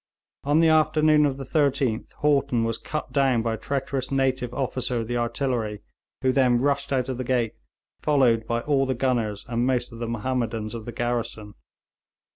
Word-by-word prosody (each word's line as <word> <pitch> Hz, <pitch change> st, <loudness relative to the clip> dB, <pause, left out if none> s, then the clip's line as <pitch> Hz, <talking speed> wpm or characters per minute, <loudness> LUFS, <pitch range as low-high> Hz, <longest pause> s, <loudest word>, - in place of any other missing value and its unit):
On 145 Hz, +3 st, +3 dB
the 165 Hz, -, +5 dB
afternoon 155 Hz, -1 st, +4 dB
of 135 Hz, -1 st, -3 dB
the 135 Hz, -, -5 dB
13th 135 Hz, -5 st, 0 dB
Haughton 140 Hz, -5 st, +2 dB
was 115 Hz, 0 st, -1 dB
cut 150 Hz, -4 st, -5 dB
down 135 Hz, -5 st, +2 dB
by 115 Hz, -1 st, 0 dB
a -, -, -3 dB
treacherous 135 Hz, +1 st, -2 dB
native 130 Hz, -2 st, 0 dB
officer 125 Hz, -2 st, -1 dB
of 110 Hz, -, -5 dB
the 120 Hz, -, -2 dB
artillery, 120 Hz, -3 st, -2 dB, 0.4 s
who 130 Hz, -, +4 dB
then 125 Hz, -2 st, +3 dB
rushed 140 Hz, +2 st, 0 dB
out 130 Hz, -2 st, +1 dB
of 130 Hz, -2 st, -4 dB
the -, -, -1 dB
gate, 120 Hz, -3 st, 0 dB, 0.5 s
followed 125 Hz, -7 st, +3 dB
by 115 Hz, 0 st, 0 dB
all 135 Hz, 0 st, +1 dB
the 130 Hz, -, 0 dB
gunners 115 Hz, -5 st, -1 dB
and 120 Hz, +1 st, 0 dB
most 125 Hz, -1 st, 0 dB
of 115 Hz, -, -10 dB
the 120 Hz, -, -3 dB
Mahommedans 115 Hz, -2 st, -2 dB
of 115 Hz, -2 st, -6 dB
the 120 Hz, -, -5 dB
garrison. 115 Hz, -3 st, -3 dB
130 Hz, 185 wpm, -25 LUFS, 115-140 Hz, 0.5 s, the